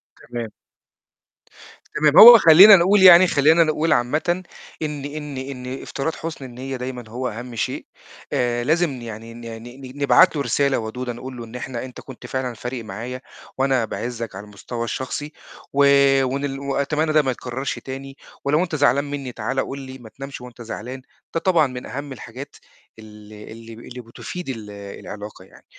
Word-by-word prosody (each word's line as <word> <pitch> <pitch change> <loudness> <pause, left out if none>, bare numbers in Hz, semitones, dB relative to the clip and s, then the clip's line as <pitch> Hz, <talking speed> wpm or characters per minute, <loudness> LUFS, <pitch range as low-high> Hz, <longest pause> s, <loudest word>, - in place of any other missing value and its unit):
تمام. 120 -2 -7 1.5
تمام، 150 -1 +3
هو 235 +2 +12
خلّينا 190 +3 +9
نقول 190 +2 +4
يعني 185 0 +9
خلّينا 160 +2 +4
نقول 155 0 +1
عامةً 155 +9 0 0.4
إن 150 -2 -4
إن 145 -1 -6
إن 130 -1 -6
افتراض 150 +4 -4
حُسن 160 -4 -7
النيّة 130 +2 -7
دايمًا 125 -1 -6
هو 125 +3 -4
أهَم 120 +2 -8
شيء، 110 - -3 0.5
آآ، 120 -1 0
لازم 155 -2 0
يعني 115 0 -9
ن 120 - -11
ن 115 0 -8 0.2
ن 130 +1 -11
نبعت 165 +5 +5
له 145 - -1
رسالة 140 +2 +1
ودودة 120 +3 -5
نقول 130 +2 -9
له 120 - -7
إن 115 - -12
إحنا 125 -1 -5
أنت 125 - -11
كنت 130 -3 -12
فعلًا 130 -2 -3
فارق 120 +1 -6
معايا 115 +5 -7 0.4
وأنا 130 -3 +1
باعِزَّك 115 -1 -5
على 95 - -7
المستوى 105 +3 -7
الشخصي 130 +5 -5 0.4
و - - -7 0.5
وإن 135 +2 -2
ل 135 -1 -4
وأتمنّى 140 +3 -1
ده 155 - +5
ما 135 -3 -1
يتكرَّرش 130 +2 -5
تاني، 135 +1 -8 0.3
ولو 150 +5 +2
أنت 170 -3 -4
زعلان 140 -1 +3
منّي 140 -3 -5
تعالَ 120 +4 -3
قُل 135 +1 -3
لي، 130 -1 -9
ما 115 -4 -13
تنامش 135 +3 -9
وأنت 125 -1 -12
زعلان، 120 +3 -7 0.3
ده 165 - 0
طبعًا 165 -4 +3
من 125 -1 -8
أهَم 140 +1 -6
الحاجات 130 +3 -10 0.4
اللي 105 -1 -13
اللي 115 0 -11
ب - - -13
اللي 125 +1 -10
بتفيد 135 +8 -8
ال 110 -5 -6
العلاقة 100 0 -9
يعني، - - -20
130 Hz, 175 wpm, -21 LUFS, 120-145 Hz, 1.5 s, هو